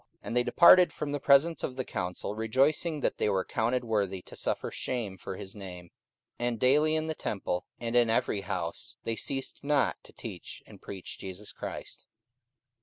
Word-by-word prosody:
44:005:041 -, -, -39 dB
And 120 Hz, -, -4 dB
they 125 Hz, -, +4 dB
departed 180 Hz, +6 st, +7 dB
from 150 Hz, -1 st, -4 dB
the 145 Hz, -, -1 dB
presence 145 Hz, +5 st, +4 dB
of 130 Hz, -, -2 dB
the 130 Hz, -1 st, -3 dB
council, 90 Hz, 0 st, -3 dB
rejoicing 140 Hz, +8 st, +1 dB
that -, -, 0 dB
they -, -, +2 dB
were 95 Hz, -2 st, +1 dB
counted 125 Hz, +3 st, 0 dB
worthy 100 Hz, -5 st, -1 dB
to -, -, -12 dB
suffer -, -, -2 dB
shame 115 Hz, -7 st, -2 dB
for 95 Hz, -, -7 dB
his 95 Hz, -, -8 dB
name. 90 Hz, -4 st, -9 dB, 0.5 s
44:005:042 120 Hz, -, 0 dB
And 120 Hz, -2 st, -2 dB
daily 150 Hz, +6 st, +4 dB
in 155 Hz, 0 st, 0 dB
the 160 Hz, -, -1 dB
temple, 95 Hz, -9 st, -3 dB
and 115 Hz, 0 st, -3 dB
in 120 Hz, -2 st, +5 dB
every 110 Hz, -2 st, +1 dB
house, -, -, -4 dB
they 115 Hz, -, -1 dB
ceased 135 Hz, +3 st, -3 dB
not 140 Hz, -1 st, +2 dB
to -, -, -14 dB
teach -, -, -8 dB
and -, -, -15 dB
preach 95 Hz, -2 st, -8 dB
Jesus 95 Hz, +2 st, -6 dB
Christ. -, -, -7 dB
120 Hz, 190 wpm, -29 LUFS, 100-140 Hz, 0.5 s, departed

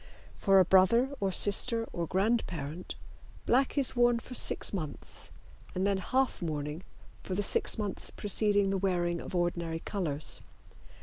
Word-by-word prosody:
For 195 Hz, -1 st, +3 dB
a 185 Hz, -, +5 dB
brother 230 Hz, +9 st, +4 dB
or 195 Hz, -1 st, 0 dB
sister 225 Hz, +5 st, +3 dB
or 170 Hz, -1 st, -3 dB
grandparent 180 Hz, -6 st, -2 dB, 0.5 s
black 265 Hz, +3 st, +2 dB
is 275 Hz, -2 st, +3 dB
worn 240 Hz, -1 st, +4 dB
for 235 Hz, -, -9 dB
six 245 Hz, -, 0 dB
months, 155 Hz, -7 st, -7 dB, 0.5 s
and 185 Hz, +1 st, 0 dB
then 200 Hz, -1 st, +1 dB
half 255 Hz, +5 st, 0 dB
mourning 150 Hz, -1 st, -4 dB, 0.4 s
for 185 Hz, -, -5 dB
the 205 Hz, -, 0 dB
six -, -, +1 dB
months 205 Hz, -3 st, -4 dB
preceding 205 Hz, -1 st, 0 dB
the 195 Hz, -, -1 dB
wearing 175 Hz, -3 st, -1 dB
of -, -, -7 dB
ordinary 170 Hz, -2 st, -1 dB
colors. 155 Hz, -8 st, -2 dB
195 Hz, 145 wpm, -30 LUFS, 175-225 Hz, 0.5 s, a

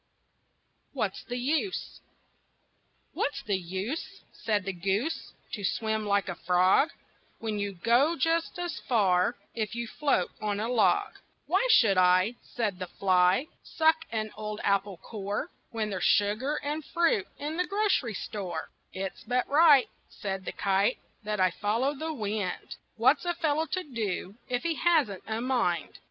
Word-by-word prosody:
WHAT'S -, -, -2 dB
THE 245 Hz, -, -4 dB
USE? 310 Hz, +10 st, -1 dB, 1.1 s
"What's 285 Hz, -, -2 dB
the 205 Hz, -, 0 dB
use," 190 Hz, -, -5 dB
Said 210 Hz, -3 st, -1 dB
the 195 Hz, -, -2 dB
goose, 195 Hz, -, -2 dB, 0.2 s
"To 205 Hz, -, -5 dB
swim 220 Hz, +1 st, -1 dB
like 200 Hz, -1 st, +2 dB
a 185 Hz, -, -2 dB
frog, 180 Hz, -, +3 dB, 0.5 s
When 215 Hz, -2 st, -3 dB
you 200 Hz, -1 st, -2 dB
go 240 Hz, -, +3 dB
just 330 Hz, +3 st, 0 dB
as 350 Hz, -1 st, -3 dB
far 200 Hz, -2 st, +2 dB, 0.2 s
If 215 Hz, -1 st, -3 dB
you 235 Hz, 0 st, -2 dB
float 235 Hz, -7 st, 0 dB
on 205 Hz, -1 st, -1 dB
a 220 Hz, -, -1 dB
log?" 330 Hz, -, +2 dB, 0.3 s
"Why -, -, +2 dB
should 210 Hz, -, +6 dB
I," 185 Hz, +4 st, +4 dB
Said 210 Hz, -6 st, -3 dB
the 185 Hz, -, -4 dB
fly, 185 Hz, -, +3 dB, 0.2 s
"Suck 320 Hz, 0 st, +2 dB
an 215 Hz, -1 st, -2 dB
old 210 Hz, 0 st, -5 dB
apple 200 Hz, -1 st, +1 dB
core, 205 Hz, +1 st, -4 dB, 0.2 s
When 220 Hz, -2 st, -2 dB
there's 190 Hz, -2 st, -3 dB
sugar 215 Hz, +8 st, +2 dB
and 300 Hz, +2 st, -2 dB
fruit 385 Hz, -, +1 dB
In 300 Hz, +3 st, -4 dB
the 360 Hz, -, 0 dB
grocery 395 Hz, -, +1 dB
store?" 180 Hz, -6 st, -5 dB, 0.2 s
"It's 190 Hz, 0 st, -5 dB
but 250 Hz, 0 st, 0 dB
right," 295 Hz, -3 st, +6 dB, 0.2 s
Said 195 Hz, -2 st, -5 dB
the -, -, -3 dB
kite, 195 Hz, 0 st, +1 dB, 0.2 s
"That 210 Hz, -1 st, -3 dB
I 185 Hz, -1 st, +4 dB
follow 220 Hz, +9 st, 0 dB
the 315 Hz, +3 st, -4 dB
wind. 210 Hz, -, -3 dB, 0.2 s
What's 255 Hz, +6 st, +4 dB
a 345 Hz, 0 st, 0 dB
fellow 320 Hz, -1 st, 0 dB
to 370 Hz, +2 st, -2 dB
do 215 Hz, -, -3 dB, 0.2 s
If 245 Hz, -1 st, -1 dB
he 335 Hz, -1 st, +1 dB
hasn't 300 Hz, -, +2 dB
a 220 Hz, +1 st, -2 dB
mind?" 240 Hz, -9 st, 0 dB
220 Hz, 155 wpm, -29 LUFS, 195-290 Hz, 1.1 s, should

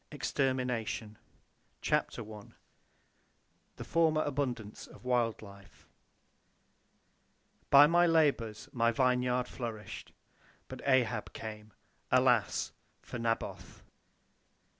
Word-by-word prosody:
EXTERMINATION 125 Hz, -6 st, -2 dB, 0.6 s
CHAPTER -, -, 0 dB
I 105 Hz, -1 st, -9 dB, 1.3 s
THE -, -, -7 dB
FORMER 160 Hz, -2 st, +2 dB
ABUNDANCE 125 Hz, -7 st, -3 dB
OF -, -, -16 dB
WILD 120 Hz, -3 st, 0 dB
LIFE 100 Hz, -2 st, -15 dB, 1.8 s
"By 140 Hz, +1 st, +9 dB
my 175 Hz, +3 st, +4 dB
labors 140 Hz, -10 st, +1 dB
my 115 Hz, -1 st, +2 dB
vineyard 125 Hz, 0 st, +1 dB
flourished. 110 Hz, -5 st, -7 dB, 0.6 s
But -, -, -9 dB
Ahab 125 Hz, -5 st, +1 dB
came. 105 Hz, -1 st, -8 dB, 0.4 s
Alas! -, -, +3 dB, 0.3 s
for 120 Hz, -, -7 dB
Naboth." 115 Hz, -1 st, -3 dB
125 Hz, 85 wpm, -32 LUFS, 110-135 Hz, 1.8 s, By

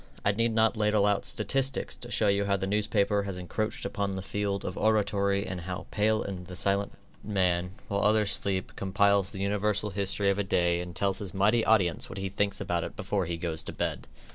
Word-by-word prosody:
I 100 Hz, -, +5 dB
need 115 Hz, +2 st, 0 dB
not 110 Hz, +1 st, +3 dB
ladle 105 Hz, -1 st, +2 dB
out 100 Hz, -1 st, +1 dB
statistics 135 Hz, -1 st, -1 dB
to 120 Hz, -, -9 dB
show 110 Hz, -3 st, +2 dB
you 100 Hz, 0 st, +2 dB
how 100 Hz, 0 st, +2 dB
the 95 Hz, -, -2 dB
newspaper 105 Hz, 0 st, +1 dB
has 100 Hz, -2 st, -5 dB
encroached 105 Hz, +4 st, -3 dB
upon 100 Hz, -1 st, -2 dB
the 95 Hz, -, -4 dB
field 100 Hz, 0 st, -2 dB
of 90 Hz, -, -4 dB
oratory 100 Hz, -2 st, +1 dB
and 90 Hz, -1 st, -5 dB
how 90 Hz, +1 st, -5 dB
the -, -, -15 dB
pale 110 Hz, +1 st, +2 dB
and 90 Hz, -3 st, -6 dB
silent 100 Hz, +1 st, 0 dB, 0.3 s
man, 90 Hz, -3 st, +1 dB
while 100 Hz, 0 st, -1 dB
others 105 Hz, 0 st, +3 dB
sleep, 95 Hz, -4 st, -1 dB
compiles 100 Hz, 0 st, +2 dB
the 95 Hz, -2 st, -6 dB
universal 105 Hz, +1 st, 0 dB
history 100 Hz, +1 st, +1 dB
of 100 Hz, -, -2 dB
a -, -, +2 dB
day 85 Hz, -2 st, +1 dB
and 90 Hz, -1 st, -7 dB
tells 100 Hz, -1 st, 0 dB
his 95 Hz, -3 st, -5 dB
mighty 105 Hz, +4 st, +3 dB
audience 95 Hz, -7 st, +2 dB
what -, -, -7 dB
he 95 Hz, 0 st, -2 dB
thinks 100 Hz, 0 st, -1 dB
about 85 Hz, -1 st, -1 dB
it -, -, -6 dB
before 95 Hz, -4 st, -1 dB
he 85 Hz, 0 st, -2 dB
goes 80 Hz, -2 st, -3 dB
to -, -, -5 dB
bed. -, -, -3 dB
100 Hz, 215 wpm, -28 LUFS, 95-105 Hz, 0.3 s, I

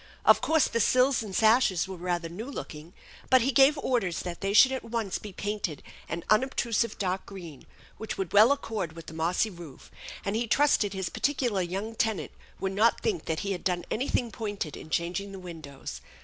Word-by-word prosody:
Of -, -, +6 dB
course 320 Hz, -3 st, +3 dB
the 230 Hz, -, -1 dB
sills 255 Hz, +3 st, +3 dB
and 205 Hz, -4 st, -6 dB
sashes 220 Hz, -5 st, +4 dB
were 190 Hz, -, -6 dB
rather 175 Hz, -1 st, -2 dB
new 210 Hz, +10 st, -7 dB
looking, 160 Hz, -, -8 dB, 0.4 s
but 260 Hz, -1 st, +6 dB
he 270 Hz, -, +2 dB
gave 275 Hz, +3 st, +5 dB
orders 230 Hz, -11 st, 0 dB
that 175 Hz, -1 st, -6 dB
they 195 Hz, 0 st, 0 dB
should 260 Hz, +6 st, +7 dB
at 260 Hz, -2 st, -3 dB
once 230 Hz, -4 st, -3 dB
be 210 Hz, -, -8 dB
painted 205 Hz, -6 st, -4 dB, 0.3 s
an 170 Hz, +1 st, -4 dB
unobtrusive 230 Hz, -1 st, +1 dB
dark 185 Hz, -1 st, -2 dB
green 170 Hz, -8 st, -10 dB, 0.3 s
which 220 Hz, -1 st, -5 dB
would 190 Hz, -3 st, -3 dB
well 215 Hz, +5 st, +7 dB
accord 220 Hz, -, -2 dB
with 165 Hz, 0 st, -10 dB
the -, -, -9 dB
mossy 175 Hz, +7 st, 0 dB
roof, 170 Hz, -7 st, -12 dB, 0.3 s
and 200 Hz, +1 st, -1 dB
he 230 Hz, +1 st, -1 dB
trusted 225 Hz, -6 st, +3 dB
his 190 Hz, -2 st, -3 dB
particular 250 Hz, -8 st, 0 dB
young 195 Hz, +5 st, -3 dB
tenant 220 Hz, -2 st, -1 dB, 0.3 s
would 190 Hz, -, -1 dB
not 220 Hz, +4 st, +3 dB
think 410 Hz, -6 st, -1 dB
that 160 Hz, -1 st, -2 dB
he 200 Hz, -, -2 dB
had 180 Hz, -, -4 dB
done 180 Hz, -2 st, -1 dB
anything 245 Hz, -1 st, 0 dB
pointed 205 Hz, -, -4 dB
in -, -, -10 dB
changing 180 Hz, +5 st, -2 dB
the -, -, -7 dB
windows. 160 Hz, -7 st, -8 dB
200 Hz, 195 wpm, -28 LUFS, 175-230 Hz, 0.4 s, should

